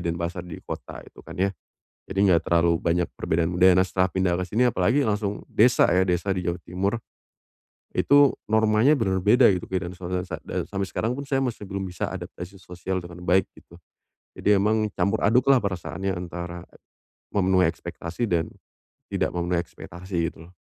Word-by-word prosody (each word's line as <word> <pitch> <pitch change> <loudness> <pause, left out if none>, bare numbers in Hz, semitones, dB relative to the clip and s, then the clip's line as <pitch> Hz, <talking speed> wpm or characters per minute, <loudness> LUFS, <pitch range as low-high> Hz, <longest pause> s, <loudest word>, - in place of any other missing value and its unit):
Denpasar, 85 +1 -3
di 85 - -8
kota - - -7
itu - - -15
kan - - -11
ya. 95 +1 +1 0.6
Jadi 95 - -4
enggak 85 -2 +4
terlalu 85 0 +3
banyak 85 +1 +1
perbedaan 80 +1 0
budaya. 90 +1 +6
Nah 95 - +4
setelah 95 0 +1
pindah 95 -2 +1
ke - - -1
sini, 110 +7 +1
apalagi 115 +7 +2
langsung 105 -1 -1
desa 120 +3 +4
ya, 90 +1 +3
desa 90 +1 0
di 90 - -3
Jawa 85 +1 -1
Timur. 95 +4 -1 1.0
Itu, 145 0 +5 0.2
normanya 110 +4 +4
benar 95 -4 0
beda 110 +4 +6
gitu. 90 - -4
Beda 95 -1 -1
dan 90 - -11
suatu 90 0 -3
sa 90 - -4 0.2
et - - -2
sampai 100 -1 -3
sekarang 115 +3 -2
pun 140 - -5
saya 135 -1 0
masih 125 -5 -3
belum 95 -1 -4
bisa 90 -2 -4
adaptasi 90 +2 -8
sosial 90 +1 -4
dengan 85 0 -10
baik, 90 +1 +3
gitu. 85 - -17 0.6
Jadi 105 -1 +3
emang, 110 +1 +2
campur 100 +4 0
aduklah 125 +4 +4
perasaannya 95 0 -3
antara, 85 -1 -6 0.6
memenuhi 95 -2 +3
ekspektasi 90 +8 -5
dan, 85 -4 0 0.6
tidak - - 0
memenuhi 85 0 0
ekspektasi 85 0 -5
gitu 80 - -14
loh. 90 - -20
95 Hz, 175 wpm, -25 LUFS, 85-105 Hz, 1.0 s, budaya